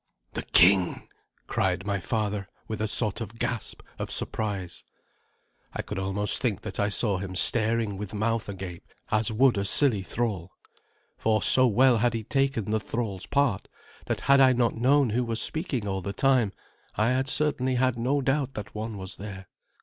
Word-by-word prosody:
"The -, -, -3 dB
king!" 90 Hz, +1 st, +3 dB, 0.4 s
cried 95 Hz, +1 st, -1 dB
my 100 Hz, -1 st, -1 dB
father, 105 Hz, -1 st, -2 dB, 0.2 s
with 110 Hz, -1 st, -4 dB
a 110 Hz, -, 0 dB
sort 105 Hz, 0 st, -1 dB
of 115 Hz, +1 st, -7 dB
gasp 120 Hz, 0 st, -3 dB, 0.2 s
of -, -, -4 dB
surprise. 100 Hz, -5 st, -3 dB, 0.9 s
I -, -, -4 dB
could -, -, -5 dB
almost 95 Hz, +2 st, 0 dB
think 115 Hz, -7 st, -1 dB
that -, -, -7 dB
I 100 Hz, 0 st, +2 dB
saw 100 Hz, -1 st, +1 dB
him 95 Hz, -1 st, -6 dB
staring 110 Hz, 0 st, 0 dB
with 100 Hz, 0 st, -6 dB
mouth 115 Hz, +1 st, -1 dB
agape 95 Hz, -3 st, -7 dB, 0.3 s
as 110 Hz, +1 st, +1 dB
would 120 Hz, -1 st, +3 dB
a -, -, -1 dB
silly 110 Hz, 0 st, +3 dB
thrall; 95 Hz, -3 st, -3 dB, 0.7 s
for 110 Hz, -2 st, +1 dB
so 130 Hz, 0 st, +7 dB
well 120 Hz, +1 st, +4 dB
had 120 Hz, +1 st, +1 dB
he 115 Hz, -, -3 dB
taken 135 Hz, -4 st, 0 dB
the 110 Hz, -, +1 dB
thrall's 105 Hz, -3 st, -4 dB
part 140 Hz, -8 st, +1 dB, 0.4 s
that -, -, -2 dB
had 140 Hz, 0 st, +4 dB
I 130 Hz, -1 st, +6 dB
not 120 Hz, -2 st, +1 dB
known 130 Hz, +1 st, +3 dB
who 125 Hz, +3 st, +1 dB
was 115 Hz, -1 st, -1 dB
speaking 145 Hz, -, 0 dB
all 95 Hz, -1 st, -2 dB
the 100 Hz, +2 st, -5 dB
time, 125 Hz, -3 st, +2 dB, 0.4 s
I 110 Hz, +2 st, +2 dB
had 130 Hz, +1 st, 0 dB
certainly 135 Hz, -3 st, 0 dB
had 130 Hz, 0 st, +2 dB
no 130 Hz, +5 st, 0 dB
doubt 135 Hz, 0 st, -1 dB
that 105 Hz, -1 st, -7 dB
one 110 Hz, 0 st, -5 dB
was 95 Hz, -1 st, -6 dB
there. 95 Hz, -2 st, -9 dB
110 Hz, 180 wpm, -27 LUFS, 100-125 Hz, 0.9 s, so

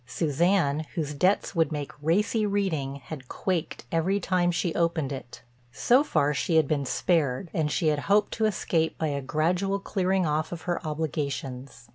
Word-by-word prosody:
Suzanne, 160 Hz, -1 st, +1 dB
whose 150 Hz, -3 st, -2 dB
debts 185 Hz, +7 st, +1 dB
would 165 Hz, -4 st, +2 dB
make 145 Hz, -2 st, -4 dB
racy 205 Hz, +8 st, +1 dB
reading, 190 Hz, -10 st, -1 dB
had 135 Hz, 0 st, -9 dB
quaked 175 Hz, -7 st, -3 dB
every 180 Hz, +5 st, +1 dB
time 180 Hz, -2 st, +1 dB
she 175 Hz, -1 st, 0 dB
opened 165 Hz, -4 st, 0 dB
it. 130 Hz, -3 st, -8 dB, 0.3 s
So 250 Hz, -, +4 dB
far 145 Hz, -, +1 dB
she 165 Hz, +4 st, 0 dB
had 160 Hz, -3 st, +4 dB
been 145 Hz, -2 st, 0 dB
spared, 160 Hz, 0 st, 0 dB
and 155 Hz, -2 st, 0 dB
she 155 Hz, +1 st, +1 dB
had 150 Hz, -1 st, +1 dB
hoped 205 Hz, +1 st, +3 dB
to 220 Hz, -, 0 dB
escape 170 Hz, -5 st, 0 dB
by 160 Hz, -, -1 dB
a 140 Hz, -1 st, -2 dB
gradual 175 Hz, +8 st, 0 dB
clearing 190 Hz, -2 st, 0 dB
off 155 Hz, +1 st, -1 dB
of 170 Hz, -2 st, -6 dB
her 175 Hz, 0 st, -2 dB
obligations. 140 Hz, -5 st, -4 dB
160 Hz, 170 wpm, -27 LUFS, 145-185 Hz, 0.3 s, So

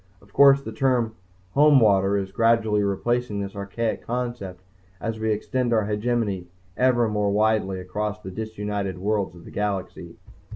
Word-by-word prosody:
Of 100 Hz, 0 st, -23 dB
course, 140 Hz, 0 st, +6 dB
the 110 Hz, -, -6 dB
term 120 Hz, -1 st, +1 dB, 0.4 s
"Homewater" 105 Hz, -9 st, +5 dB
is 95 Hz, -1 st, -5 dB
gradually 110 Hz, 0 st, +2 dB
replacing 105 Hz, +2 st, -1 dB
this 100 Hz, 0 st, -5 dB
archaic 100 Hz, +3 st, -3 dB
concept 120 Hz, -7 st, -4 dB, 0.4 s
as 115 Hz, -1 st, -4 dB
we 110 Hz, 0 st, 0 dB
extend 120 Hz, +3 st, -1 dB
our 110 Hz, -2 st, +2 dB
hegemony 105 Hz, -3 st, -1 dB, 0.3 s
ever 120 Hz, -1 st, +3 dB
more 105 Hz, -1 st, 0 dB
widely 105 Hz, -2 st, +1 dB
across 105 Hz, +3 st, -4 dB
the 95 Hz, -3 st, -8 dB
disunited 105 Hz, -2 st, -4 dB
worlds 100 Hz, -1 st, -1 dB
of 85 Hz, -, -14 dB
the -, -, -11 dB
galaxy. 100 Hz, -2 st, -4 dB
105 Hz, 150 wpm, -24 LUFS, 100-115 Hz, 0.4 s, course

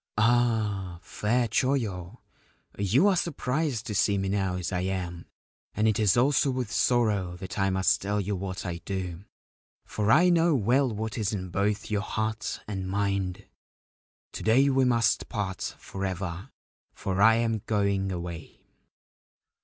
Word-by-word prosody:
' -, -, -54 dB
Ah, 110 Hz, -5 st, +1 dB
fair 120 Hz, +3 st, 0 dB
Choyo, 110 Hz, -6 st, -1 dB, 0.6 s
you 110 Hz, -, +3 dB
are 200 Hz, -, +4 dB
surprised 145 Hz, -, -1 dB
to 110 Hz, -, -4 dB
see 100 Hz, 0 st, +2 dB
me 95 Hz, 0 st, -1 dB
now 95 Hz, -2 st, 0 dB
as 90 Hz, -2 st, -3 dB
I 90 Hz, -, -1 dB
am, 90 Hz, -2 st, -3 dB, 0.5 s
and 110 Hz, +1 st, +2 dB
it 110 Hz, -1 st, +2 dB
is 105 Hz, 0 st, +3 dB
also 135 Hz, +3 st, +3 dB
with 125 Hz, -4 st, -2 dB
sorrow 105 Hz, -8 st, +1 dB
that 95 Hz, +2 st, -6 dB
I 95 Hz, 0 st, +2 dB
must 95 Hz, +2 st, +2 dB
tell 105 Hz, +1 st, -1 dB
you 100 Hz, +1 st, -2 dB
what 95 Hz, 0 st, -5 dB
I 85 Hz, -2 st, -3 dB
do, 90 Hz, 0 st, -5 dB, 0.6 s
for 105 Hz, 0 st, 0 dB
I 175 Hz, +7 st, +6 dB
know 170 Hz, -2 st, +4 dB
well 130 Hz, +4 st, +2 dB
what 110 Hz, +1 st, -4 dB
is 105 Hz, -1 st, -1 dB
in 95 Hz, -3 st, -4 dB
both 100 Hz, +3 st, -1 dB
your 105 Hz, -1 st, +1 dB
heart 110 Hz, +1 st, -3 dB
and 95 Hz, -3 st, -4 dB
mind. 100 Hz, -1 st, -1 dB, 0.9 s
To -, -, -7 dB
day 130 Hz, +5 st, +4 dB
we 135 Hz, 0 st, +3 dB
must 120 Hz, -2 st, +2 dB
part 95 Hz, -3 st, -3 dB
for 95 Hz, -, -7 dB
ever, 95 Hz, -1 st, -4 dB, 0.5 s
for 95 Hz, 0 st, -2 dB
I 110 Hz, +2 st, +7 dB
am 115 Hz, -2 st, 0 dB
going 100 Hz, -2 st, +1 dB
away.' 85 Hz, -2 st, -6 dB
105 Hz, 160 wpm, -27 LUFS, 95-115 Hz, 0.9 s, I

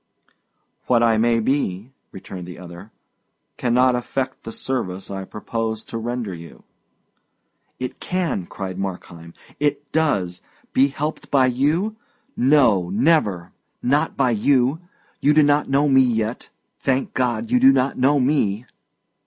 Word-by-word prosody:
"What 120 Hz, -2 st, +3 dB
I 115 Hz, -2 st, +3 dB
may 115 Hz, 0 st, +3 dB
be," 115 Hz, -3 st, -1 dB, 0.2 s
returned 95 Hz, -1 st, -9 dB
the 90 Hz, -, -9 dB
other, 90 Hz, +3 st, -11 dB, 0.7 s
"cannot 125 Hz, +1 st, +2 dB
affect 130 Hz, +2 st, -3 dB
the 115 Hz, -, -5 dB
service 95 Hz, -9 st, -4 dB
I 95 Hz, -1 st, -5 dB
propose 110 Hz, +1 st, -4 dB
to 115 Hz, -, -5 dB
render 120 Hz, -3 st, -3 dB
you." 85 Hz, -1 st, -12 dB, 1.2 s
"It 130 Hz, -1 st, -5 dB
can," 175 Hz, -, -2 dB
cried 95 Hz, -1 st, -6 dB
Markheim; 85 Hz, -3 st, -7 dB, 0.2 s
"it 145 Hz, 0 st, -1 dB
does! 95 Hz, -, 0 dB, 0.3 s
Be 135 Hz, +2 st, +5 dB
helped 150 Hz, +3 st, -5 dB
by 135 Hz, -2 st, +4 dB
you? 150 Hz, -, 0 dB, 0.4 s
No, 120 Hz, -10 st, +3 dB
never; 105 Hz, -, +1 dB, 0.3 s
not 140 Hz, +4 st, +1 dB
by 125 Hz, -, +2 dB
you! 130 Hz, +6 st, +2 dB, 0.4 s
You 150 Hz, +1 st, +3 dB
do 155 Hz, -, +6 dB
not 145 Hz, 0 st, +2 dB
know 140 Hz, +2 st, +3 dB
me 135 Hz, -1 st, +5 dB
yet; 115 Hz, -2 st, -1 dB, 0.3 s
thank 135 Hz, 0 st, -1 dB
God, 130 Hz, -, -1 dB
you 250 Hz, -, +4 dB
do 265 Hz, +2 st, +7 dB
not 135 Hz, -, +1 dB
know 140 Hz, +3 st, +3 dB
me!" 125 Hz, -5 st, +1 dB
125 Hz, 135 wpm, -22 LUFS, 100-140 Hz, 1.2 s, do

